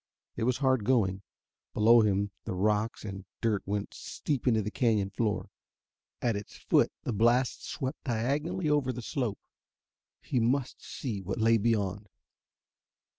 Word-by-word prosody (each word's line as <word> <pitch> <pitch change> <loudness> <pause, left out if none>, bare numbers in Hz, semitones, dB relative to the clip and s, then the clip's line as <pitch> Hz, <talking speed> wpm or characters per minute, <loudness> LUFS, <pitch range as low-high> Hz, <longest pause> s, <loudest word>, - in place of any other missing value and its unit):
It 115 - -1
was 125 0 +2
hard 130 -4 +2
going. 100 -5 +2 0.5
Below 115 +2 +6
him 100 -1 +1
the - - -3
rocks 105 +4 0
and 95 -2 -6 0.2
dirt 110 -4 +1
went 100 0 -2
steep 145 -5 -3
to 115 -4 +4
the 105 - -3
canyon 105 -6 +1
floor. 105 0 -1 0.7
At 115 -3 +2
its 100 0 -7
foot - - +3
the 120 - -2
blast 120 +4 +2
swept 130 +4 -5
diagonally 145 +9 -1
over 145 -3 +2
the 125 -1 -6
slope. 120 -4 -2 0.8
He 125 - -1
must 125 +3 0
see 110 -8 -4
what 95 +3 -4
lay 115 0 +4
beyond.... 105 -2 0
115 Hz, 145 wpm, -30 LUFS, 105-125 Hz, 0.8 s, Below